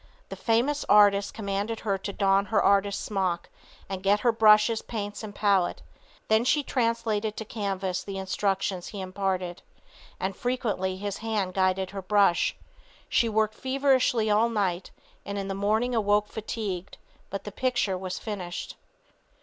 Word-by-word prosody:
The - - -5
famous 250 +6 +1
artist 205 -1 +5
commanded 205 +1 -3
her 200 -2 0
to 200 - -4
don 195 0 +2
her 215 +2 +2
artist 200 0 +2
smock 185 -4 -2 0.4
and 190 -1 -5
get 200 +2 +2
her 240 - +4
brushes, 220 0 +5
paints 205 -3 -5
and 210 -2 -8
palette; 200 -4 +1 0.4
then 220 +1 +3
she 290 +4 +2
translated 230 -4 -1
to 220 - -4
canvas 195 -4 -3
the 195 -1 -6
instructions 190 -1 -1
he 205 - -7
imparted, 185 -2 -2 0.6
and 190 0 -2
frequently 210 -7 -1
his 200 0 -4
hand 215 -5 -2
guided 190 0 +1
her 195 -1 -5
brush. 195 -2 +2 0.5
She 230 - +2
worked 215 0 +1
feverishly 260 -3 +2
all 215 +2 +3
night, 195 -5 -1 0.3
and 200 0 -5
in 195 -1 -3
the - - -1
morning 215 +5 0
awoke 210 -2 +2
fatigued, 200 -4 -5 0.3
but 195 - -5
the 205 - -7
picture 240 -4 0
was 185 0 -4
finished. 185 -5 -6
205 Hz, 150 wpm, -27 LUFS, 195-220 Hz, 0.6 s, artist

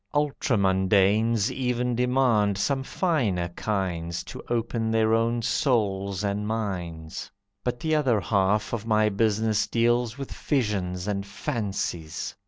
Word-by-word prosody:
Ultramundanes 105 -5 +2
Even 125 -1 -1
demand 125 -5 +2
some 135 +7 0
finer 120 - 0
kinds 85 -3 -2
To - - -9
open 115 -1 -1
their 110 0 +2
own 115 +1 +1
souls 100 - 0
and 105 +1 -1
minds. 90 -8 -4 0.3
But 125 -1 -2
the 160 +3 -1
other 135 -8 +3
half 100 +1 +1
of 115 -1 -3
my 110 -1 +3
business 110 +1 +1
deals 120 +1 +1
With 135 -1 -6
visions 100 - -1
and 100 -1 -1
fancies. 100 - -4
110 Hz, 120 wpm, -26 LUFS, 100-120 Hz, 0.3 s, other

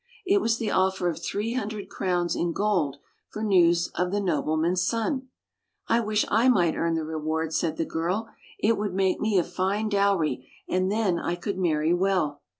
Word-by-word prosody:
It 395 +2 +3
was 230 -6 +1
the 225 -3 -2
offer 190 -1 +1
of 165 - -5
three 215 +3 -2
hundred 215 -4 -4
crowns 175 -2 -1
in 170 -1 -1
gold 175 -10 0 0.3
for 215 - -6
news 175 -4 +3
of 180 0 -1
the 205 +2 0
nobleman's 170 -1 0
son. 230 +6 -1 0.3
" 430 -2 -52
I 230 - +3
wish 215 -2 +1
I 230 +5 +4
might 175 -9 +3
earn 165 0 0
the 160 - -1
reward," 160 0 -2
said 160 -1 -1
the 165 - 0
girl. 180 +9 -2 0.2
" - - -23
It 225 0 +2
would 205 -3 -2
make 190 -1 +1
me 215 -2 +1
a 175 - +4
fine 200 +5 -1
dowry, 195 - +1 0.2
and 185 +1 0
then 205 -5 +1
I 175 - -2
could 185 +2 -4
marry 160 -2 +2
well." 175 -6 0
185 Hz, 195 wpm, -26 LUFS, 170-210 Hz, 0.3 s, I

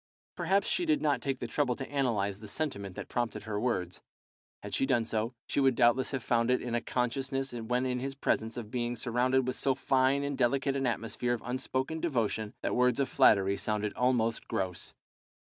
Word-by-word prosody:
Perhaps 190 +3 +1
she 355 - 0
did 315 -3 +2
not 145 -2 +1
take 135 -2 -1
the 125 - -5
trouble 125 +1 0
to 135 - -6
analyse 110 -8 0
the 110 - -9
sentiment 100 - -4
that - - -6
prompted 120 -4 -2
her 110 -2 -3
words. 95 -7 -2 0.6
Had - - -7
she 135 - +1
done 120 -4 +2
so, 115 +2 -2
she - - -1
would 135 -2 +4
doubtless 120 +2 +3
have 135 -4 -3
found 115 0 +2
it 125 - +3
in 120 -1 -4
a 120 - +1
consciousness 135 +2 -2
when 120 +2 -1
in 125 -1 -1
his 135 +1 -4
presence 115 -4 -1
of 110 -3 -6
being 120 -1 -1
surrounded 125 +2 +1
with 130 - -2
so 135 -1 +1
fine 135 +1 +2
and 140 -1 -3
delicate 135 +2 +2
an 135 -1 0
atmosphere 120 +1 -1
of 115 - -10
unspoken 130 +4 -2
devotion 110 -9 -1
that - - 0
words 125 +2 +3
of 135 -2 +1
flattery 100 -1 +4
sounded 105 -1 -1
almost 120 -2 +1
gross. 95 -2 -3
125 Hz, 200 wpm, -30 LUFS, 115-135 Hz, 0.6 s, would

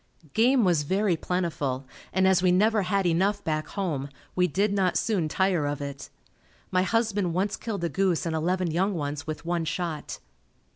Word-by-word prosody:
Game 245 +2 +4
was 175 -5 +3
very 190 +5 +1
plentiful 155 -7 -2 0.3
and 190 0 +3
as 190 -1 +4
we 185 -1 +4
never 210 +4 +3
had 195 +1 0
enough 190 +4 +1
back 155 -1 -1
home, 150 -8 -3 0.3
we 180 0 +3
did 200 +5 +1
not 190 -3 +2
soon 195 -8 0
tire 180 -3 +1
of 145 -1 -2
it. 140 -1 -6 0.6
My 185 - +3
husband 205 -3 0
once 200 +2 0
killed 205 -6 -4
a 170 - +1
goose 185 +1 +1
and 165 -1 -1
eleven 175 +2 0
young 190 +4 +1
ones 145 -1 -4
with 155 +1 -5
one 170 -1 0
shot. 160 -1 -3
180 Hz, 180 wpm, -27 LUFS, 160-195 Hz, 0.6 s, Game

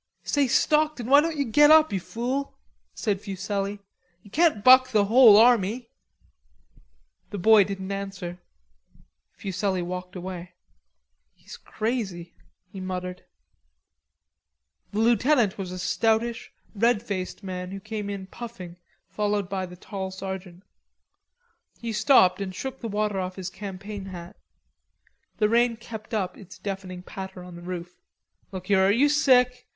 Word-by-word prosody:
"Say, 285 -2 +1
Stockton, 300 -1 +2
why 280 +4 +6
don't 325 0 -2
you 280 - 0
get 295 +6 +5
up, 315 -5 +6
you 195 - 0
fool?"' 250 +8 -4 0.4
said 200 -4 -1
Fuselli. 200 0 -3 0.5
"You 205 - -17
can't 310 -7 +2
buck 255 0 +7
the 210 -5 +3
whole 225 -1 +8
army." 230 0 +3 1.4
The 205 - -5
boy 215 +2 +6
didn't 195 0 -5
answer. 195 -3 -5 0.9
Fuselli 190 -1 -2
walked 180 +1 -6
away. 180 -1 -7 0.8
"He's - - -12
crazy," 205 -7 -4 0.3
he 195 - -10
muttered. 180 -1 -5 1.7
The 205 - -5
lieutenant 235 -2 +3
was 185 -2 -5
a 185 - -6
stoutish 225 +5 0 0.2
red 230 +1 +2
faced 195 -2 -5
man 180 -1 -5
who 195 +1 -6
came 215 0 -5
in 200 -1 -5
puffing 190 -5 -9 0.3
followed 205 0 -1
by 190 -1 -3
the 180 - -11
tall 190 0 -6
sergeant. 190 -1 -7 1.2
He 230 -1 -4
stopped 210 -4 +4
and 190 -1 -5
shook 265 +4 -6
the 230 - -4
water 210 -1 -1
off 185 0 -4
his 190 -1 -6
Campaign 200 0 -7
hat. 180 0 -9 1.0
The 210 - +3
rain 235 +1 +2
kept 220 -2 -10
up 195 -5 -2
its 190 -1 -13
deafening 185 -2 -6
patter 190 -1 -8
on 180 -1 -11
the 170 - -10
roof. 175 0 -7 0.5
"Look 185 -2 -7
here, 195 0 +3
are 195 - +4
you 255 +8 +4
sick? 250 -4 +3
200 Hz, 140 wpm, -25 LUFS, 185-235 Hz, 1.7 s, whole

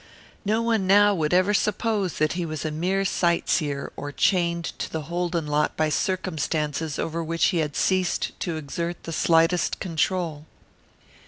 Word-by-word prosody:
No 220 +2 +1
one 225 -5 +1
now 205 +1 +6
would 155 -5 -1
ever 185 +3 +3
suppose 210 -2 0
that 155 0 +1
he 175 0 -2
was 155 -1 -4
a 155 - -1
mere 185 +5 0
sightseer 165 -6 0
or 145 +1 -5
chained 170 0 +1
to - - -4
the 160 -1 -3
Holden 170 +1 -2
lot 150 0 0
by 155 -1 +2
circumstances 155 -3 -1
over 165 +1 -2
which 165 +1 +1
he 180 - 0
had 150 -2 -2
ceased 185 -1 +1
to 170 -2 -2
exert 170 +3 -4
the 165 - -5
slightest 165 +2 +2
control. 165 -2 -1
170 Hz, 160 wpm, -25 LUFS, 155-185 Hz, -, now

